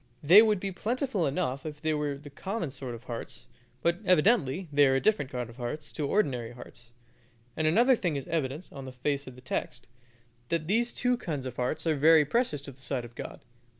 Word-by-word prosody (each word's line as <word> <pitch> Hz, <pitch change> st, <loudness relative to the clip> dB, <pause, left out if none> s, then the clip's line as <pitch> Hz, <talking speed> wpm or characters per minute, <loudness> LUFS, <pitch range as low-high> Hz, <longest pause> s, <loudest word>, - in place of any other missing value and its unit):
They 180 Hz, +8 st, +9 dB
would 215 Hz, -3 st, +3 dB
be 195 Hz, +1 st, -3 dB
plentiful 225 Hz, -, -1 dB
enough 140 Hz, -2 st, -2 dB
if 150 Hz, -2 st, -7 dB
they 155 Hz, +1 st, 0 dB
were 150 Hz, -2 st, -1 dB
the 145 Hz, +1 st, -12 dB
common 190 Hz, 0 st, -4 dB
sort 130 Hz, -3 st, -6 dB
of 115 Hz, -, -12 dB
hearts, 120 Hz, -, -7 dB, 0.4 s
but 170 Hz, +1 st, +2 dB
evidently 180 Hz, -, +3 dB
they 145 Hz, 0 st, +6 dB
are 135 Hz, -, +3 dB
a -, -, +3 dB
different 200 Hz, -7 st, +1 dB
kind 125 Hz, -3 st, -4 dB
of 115 Hz, +1 st, -14 dB
hearts 135 Hz, +5 st, -5 dB
to 150 Hz, -3 st, -2 dB
ordinary 125 Hz, -, 0 dB
hearts; 120 Hz, -1 st, -13 dB, 0.7 s
and 155 Hz, 0 st, +1 dB
another 240 Hz, +11 st, +5 dB
thing 175 Hz, -8 st, -1 dB
is 140 Hz, -, -4 dB
evident 155 Hz, 0 st, -2 dB
on 135 Hz, -2 st, -8 dB
the 130 Hz, -, -7 dB
face 140 Hz, +2 st, -2 dB
of 130 Hz, -, -9 dB
the 125 Hz, -, -14 dB
text, 125 Hz, -1 st, -4 dB, 0.6 s
that 165 Hz, -2 st, 0 dB
these 235 Hz, +7 st, 0 dB, 0.2 s
kind 145 Hz, -, -4 dB
of 125 Hz, -2 st, -5 dB
hearts 130 Hz, +6 st, -1 dB
are 160 Hz, -2 st, +2 dB
very 155 Hz, +1 st, +6 dB
precious 150 Hz, -, -1 dB
in 140 Hz, -, -8 dB
the 135 Hz, -, -20 dB
sight 130 Hz, -2 st, -1 dB
of 120 Hz, -, -12 dB
God. -, -, -8 dB
150 Hz, 215 wpm, -29 LUFS, 130-180 Hz, 0.7 s, They